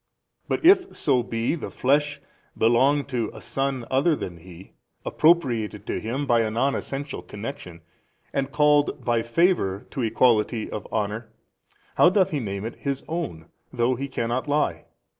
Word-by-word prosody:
But - - -2
if 375 +1 +5
so 130 -4 +2
be 115 +1 -1
the 165 - -5
flesh, 145 +2 +1 0.4
belong 130 +6 +3
to 120 -4 -2
a - - -8
son 135 -3 -2
other 145 +5 +3
than 90 -10 -6
He, 90 +2 -14 0.3
appropriated 120 - +2
to - - -2
Him 130 +6 -3
by 120 -3 +3
a 110 -1 +1
non 130 +6 +1
essential 140 +1 -4
connection, 105 -6 -8 0.5
and 140 0 -1
called 150 0 +2
by 120 -1 +2
favour 115 - +1
to 135 - -3
equality 115 -1 +2
of 105 - -5
honour, 110 +1 -2 0.7
how 175 - +7
doth 185 -1 +2
He 150 - -1
name 100 -3 -4
it 115 - -6
His 140 -1 -3
own, 155 - -4 0.3
though 120 +1 +1
He 135 +3 -4
cannot 125 0 -2
lie? 150 +1 0
130 Hz, 160 wpm, -24 LUFS, 110-145 Hz, 0.7 s, how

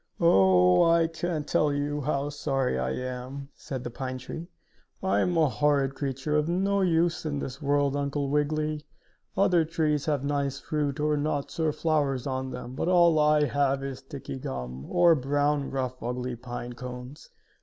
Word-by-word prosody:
"Oh, 95 - +5
I 165 0 +4
can't 165 -1 -3
tell 150 -1 +2
you 145 +1 -1
how 140 0 -1
sorry 135 -3 -1
I - - -1
am," 130 +2 -5
said 130 -3 -6
the 120 - -5
pine 130 +1 -4
tree. 160 +6 -7 0.6
"I 190 - +2
am 175 -1 +1
a 160 -2 +5
horrid 140 +2 +1
creature, 135 +2 -2
of 150 +1 +1
no 195 +3 +1
use 170 -2 +2
in 150 -2 -2
this 135 0 -5
world, 145 -1 +1
Uncle 140 0 -1
Wiggily! 150 +1 0 0.5
Other 180 -4 +4
trees 155 -2 0
have 145 -3 0
nice 140 -1 -1
fruit 150 -1 -2
or 150 0 +1
nuts 145 +1 -2
or 160 -1 +2
flowers 150 -4 0
on 130 -1 -2
them, 125 -1 -7
but 135 - -2
all 170 -3 +5
I 150 0 +4
have 140 -1 +1
is 135 -2 -5
sticky 135 0 -8
gum, 65 - -6
or 175 -1 +5
brown, 145 0 0
rough 130 -1 -3
ugly 125 +1 -3
pine 120 0 -6
cones. 125 +2 -9
145 Hz, 170 wpm, -27 LUFS, 130-155 Hz, 0.6 s, Oh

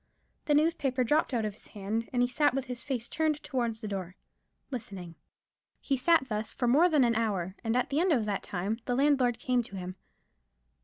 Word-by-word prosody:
The 295 - +3
newspaper 290 -5 +2
dropped 300 +6 +2
out 230 -4 0
of 210 - -3
his 210 - -16
hand: 215 +3 -3
and 245 -1 +2
he - - +3
sat 260 +2 +2
with 270 -1 -1
his 250 -1 -4
face 255 -5 -3
turned 310 -2 0
towards 235 -4 -2
the 215 - -4
door: 190 -3 -5 0.6
listening. 195 -9 -6 0.7
He 275 - 0
sat 265 +1 +3
thus 215 -1 -3
for 245 - -1
more 305 +9 +5
than 300 -5 +4
an 235 -1 +3
hour, 200 -6 -1
and 225 +1 +1
at 250 - 0
the 285 - +2
end 360 +1 +3
of 240 -8 +2
that 205 -2 -1
time 200 +5 -3
the 245 - 0
landlord 265 -3 +3
came 250 +1 +1
to 210 -4 -9
him. 185 -1 -5
245 Hz, 210 wpm, -30 LUFS, 215-275 Hz, 0.7 s, more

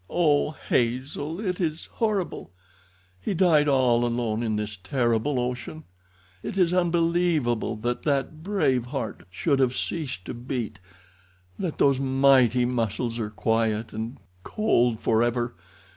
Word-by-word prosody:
Oh! 150 -4 +2 0.2
Hazel, 130 +7 -1
it 185 -4 -2
is 160 -2 -2
horrible! 210 -5 -2 0.7
He 190 - -2
died 160 -4 +4
all 125 -4 +3
alone 120 -2 -1
in 110 -2 -1
this 105 0 -3
terrible 120 +6 0
ocean! 125 +5 -4 0.6
It 195 - -5
is 180 -2 +3
unbelievable 170 -9 +1
that 120 +3 -2
that 145 +1 -1
brave 145 - +1
heart 125 -7 -5
should 135 - 0
have 130 -1 +2
ceased 130 - -3
to - - -5
beat—that 95 - -7
those 140 -2 +3
mighty 130 -2 +4
muscles 115 -1 -1
are 105 -2 -2
quiet 110 0 0
and 110 +4 -5 0.3
cold 120 - +1
forever! 120 +1 +1
125 Hz, 125 wpm, -26 LUFS, 115-155 Hz, 0.7 s, died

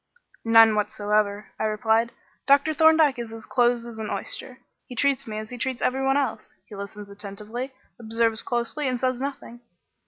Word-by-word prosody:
"None 225 -1 +7
whatever," 210 -1 0
I - - 0
replied. 220 +2 +1 0.4
"Dr. 280 +3 +4
Thorndyke 315 -4 +5
is 235 -2 -5
as 225 -1 -9
close 245 -2 +2
as 230 -2 -9
an 215 -1 -4
oyster. 255 -1 -5 0.3
He 250 - -9
treats 275 +1 +1
me 215 -1 -5
as 215 +1 -6
he 245 - -7
treats 260 0 -2
every 265 +1 +1
one 270 +1 +3
else 245 -6 -3
he 210 - -11
listens 200 0 -8
attentively, 210 +6 -6 0.3
observes 225 0 +1
closely, 240 +4 -2
and 250 -1 -1
says 255 0 -1
nothing." 270 -4 -6
235 Hz, 175 wpm, -25 LUFS, 215-265 Hz, 0.4 s, None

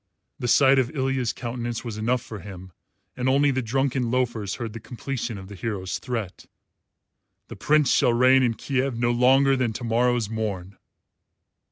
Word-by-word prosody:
The 120 - -2
sight 135 +2 +5
of 125 -2 +1
Ilya's 130 -3 0
countenance 120 0 -5
was 115 -3 -5
enough 120 +3 0
for 110 - -8
him, 95 -2 -10 0.4
and 125 +1 -1
only 140 +2 +3
the 130 0 -1
drunken 130 +1 -1
loafers 115 -5 -1
heard 115 -3 -6
the 115 - -7
completion 120 0 -5
of 95 -1 -10
the 100 - -10
hero's 95 -1 -4
threat 115 -7 -5 0.5
" - - -54
the - - -8
Prince 150 -3 +2
shall - - +4
reign 130 +2 +5
in 120 -3 +1
Kiev 130 -1 -2
no 120 0 +1
longer 135 +3 +4
than 125 -4 -1
to 120 - -7
morrow's 120 0 +1
morn." 100 -4 -4
120 Hz, 175 wpm, -24 LUFS, 110-130 Hz, 0.5 s, sight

